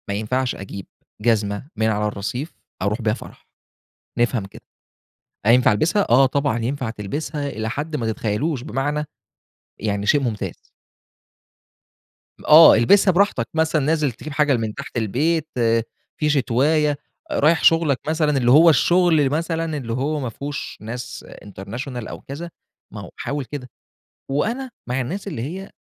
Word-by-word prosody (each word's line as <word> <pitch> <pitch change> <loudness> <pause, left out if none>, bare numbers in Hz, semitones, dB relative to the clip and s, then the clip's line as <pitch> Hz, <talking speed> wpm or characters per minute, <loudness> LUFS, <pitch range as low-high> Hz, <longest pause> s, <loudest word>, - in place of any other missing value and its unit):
ما 100 - -2
ينفعش 120 +5 -1
أجيب 100 -1 -8 0.4
جزمة 105 0 0
من 110 0 +1
على 105 -1 0
الرصيف 110 - -4 0.3
أرُوح 105 +5 -1
بيها 110 -1 +1
فرَح، 120 - -11 0.7
نفهم 120 -3 +1
كده. 95 - -14 0.8
هينفَع 120 +2 +5
ألبِسها؟ 170 - +2
آه، 130 +3 +6
طبعًا 140 -3 0
ينفَع 125 +1 -2
تلبِسها 140 +8 -4
إلى 110 -4 -4
حد 150 +6 -4
ما 120 -6 -2
تتخيّلوش، 120 +6 -2
بمعنى؟ 145 +2 -2 0.8
يعني 100 -1 -2
شيء 145 +7 +3
ممتاز. 115 -5 -3 1.9
آه 160 +1 +10
البِسها 190 - +5
براحتك، 180 - +1
مثلًا 160 -1 +1
نازل 150 -2 +1
تجيب 145 +5 -9
حاجة 145 -2 +3
من 110 -2 -3
تحت 140 -2 -7
البيت، 150 +9 0 0.7
في 150 - +1
شتواية، 145 +2 +2 0.3
رايح 170 - +3
شُغلك 165 -5 +4
مثلًا، 155 -2 +1
اللي 120 -2 +3
هو 160 +5 +8
الشغل 165 -1 +4
مثلًا 165 +1 -2
اللي 115 -5 -4
هو 145 +5 -1
ما 130 -4 -3
فهوش 145 +6 -6
ناس 115 +3 -7 0.2
international 115 +5 -7
أو - - -8
كذا، 155 +5 -7 0.4
ما - - -7
هو - - -10
حاوِل 140 -1 -3
كده. 130 -2 -7 0.6
وأنا 235 - -1 0.2
مع 125 +2 0
الناس 185 +12 -5
اللي 155 -12 -4
هي 185 - -6
135 Hz, 145 wpm, -21 LUFS, 115-155 Hz, 1.9 s, آه